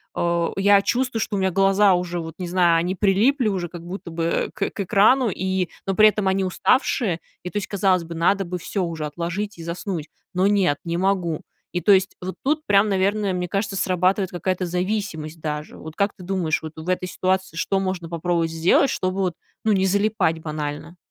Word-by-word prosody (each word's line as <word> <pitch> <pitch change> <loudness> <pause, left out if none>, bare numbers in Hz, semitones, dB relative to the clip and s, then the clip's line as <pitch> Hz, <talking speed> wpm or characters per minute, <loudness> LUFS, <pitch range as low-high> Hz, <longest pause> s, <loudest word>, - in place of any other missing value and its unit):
а, 170 0 0
я 200 +1 +5
чувствую, 250 0 0
что 210 - -2
у - - 0
меня 190 0 +2
глаза 195 +1 +4
уже, 175 0 -2
вот 165 -1 -7
не 180 - -4
знаю, 175 -1 +3
они 175 +3 0
прилипли 215 +7 +3
уже 185 -4 -1
как 170 0 -9
будто 180 -1 -7
бы 165 0 -1
к 200 - -1
к - - -14
экрану, 215 +6 +4
и, 185 -2 -1 0.2
но 195 - 0
при 215 +1 +7
этом 210 -2 -2
они 190 0 +2
уставшие. 190 -1 +1 0.2
И 180 - -4
то 210 - -4
есть, 205 - -2
казалось 190 -3 +2
бы, 165 0 -8
надо 195 +4 +2
бы 180 +1 -4
всё 190 +2 -2
уже 165 -3 -3
отложить 175 +7 -4
и 165 - -8
заснуть, 170 -1 -4 0.2
но 185 +1 +2
нет, 195 -8 +2
не 170 0 -2
могу. 180 -4 0 0.3
И 175 - -1
то 205 - +4
есть 190 0 +3
вот 185 +1 -5
тут 305 +3 0
прям, 205 +1 +4
наверное, 200 +1 +1
мне 180 0 -2
кажется, 200 +1 -2
срабатывает 185 +1 +1
какая-то 180 +1 -2
зависимость 180 -3 -3
даже. 150 -1 -4
Вот 160 0 -9
как 200 +1 +1
ты 185 - -12
думаешь, 180 -4 -1
вот 160 - -6
в 160 +2 -8
этой 185 0 0
ситуации 185 -2 -1
что 195 +3 0
можно 185 -3 -3
попробовать 170 0 0
сделать, 165 +11 +3
чтобы 185 +1 -2
вот, 185 -3 0 0.3
ну, 220 - +4
не 190 -1 +2
залипать 200 -4 +1
банально? 155 +2 -5
185 Hz, 210 wpm, -23 LUFS, 170-200 Hz, 0.3 s, при